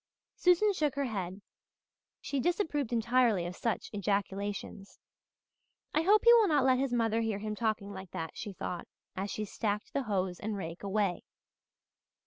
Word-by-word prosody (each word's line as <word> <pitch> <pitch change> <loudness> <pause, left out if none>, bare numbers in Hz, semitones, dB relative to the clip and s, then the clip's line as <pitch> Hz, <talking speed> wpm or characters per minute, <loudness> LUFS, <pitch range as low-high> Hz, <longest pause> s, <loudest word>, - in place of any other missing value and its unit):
Susan 365 +4 +4
shook 300 -6 0
her 280 0 0
head. 195 -4 -4 0.8
She 280 - -2
disapproved 315 - 0
entirely 235 -5 +3
of 175 +1 -5
such 230 +3 -2
ejaculations. 200 0 -3 1.0
"I 310 - +3
hope 410 +5 +5
he 470 - +10
will 455 -3 +6
not 295 -6 +3
let 260 -1 +4
his 270 -1 0
mother 230 -2 +1
hear 220 -3 -1
him 215 +1 -4
talking 210 -2 -2
like 190 -1 -8
that," 165 0 -5
she 210 - -6
thought 180 -2 -5 0.3
as 195 +2 -3
she 215 - -3
stacked 210 0 -3
the 280 - +1
hoes 190 -6 -1
and 210 0 -3
rake 165 -2 -6
away. 200 -2 0
215 Hz, 160 wpm, -31 LUFS, 195-270 Hz, 1.0 s, he